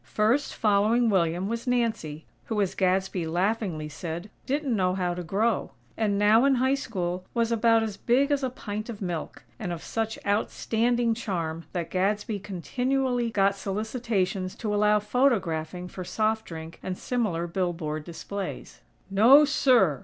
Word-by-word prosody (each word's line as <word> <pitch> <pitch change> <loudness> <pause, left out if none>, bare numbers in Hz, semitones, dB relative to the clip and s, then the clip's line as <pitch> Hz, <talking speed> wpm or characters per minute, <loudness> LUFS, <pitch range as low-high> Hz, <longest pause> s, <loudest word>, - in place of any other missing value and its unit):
First, 230 +7 +2
following 220 +3 +3
William, 175 0 +1
was 230 +3 -4
Nancy, 225 -11 -1 0.2
who, 220 -2 -2
as 195 -3 +1
Gadsby 190 -2 0
laughingly 180 -2 -1
said, 170 +6 -6 0.2
"didn't 275 -2 0
know 185 -2 +1
how 180 -2 0
to 180 - -5
grow;" 210 +7 0 0.2
and 210 -3 +1
now, 210 +3 +5
in 275 -1 +4
High 260 +2 +2
School, 185 -9 -3
was 230 -1 +1
"about 230 0 +4
as 210 -3 -4
big 270 +7 +2
as 285 -1 +2
a 260 - 0
pint 215 -2 -6
of 220 -3 -6
milk;" 175 -5 -5 0.2
and 180 -5 -3
of 170 -2 -5
such 225 -1 -2
outstanding 230 +3 +1
charm 170 -8 -3
that 170 -2 -3
Gadsby 205 +3 0
continually 245 +6 -1
got 200 -2 +3
solicitations 200 -2 -2
to 210 -2 -3
allow 210 0 +4
photographing 185 - 0
for 185 +1 -7
soft 215 +4 0
drink 160 0 -8
and 185 -1 -4
similar 210 -9 -1
billboard 170 -4 -2
displays. 185 +4 -6 0.3
"No, 245 +10 +7
sir!! 245 - +3
205 Hz, 155 wpm, -27 LUFS, 180-230 Hz, 0.3 s, No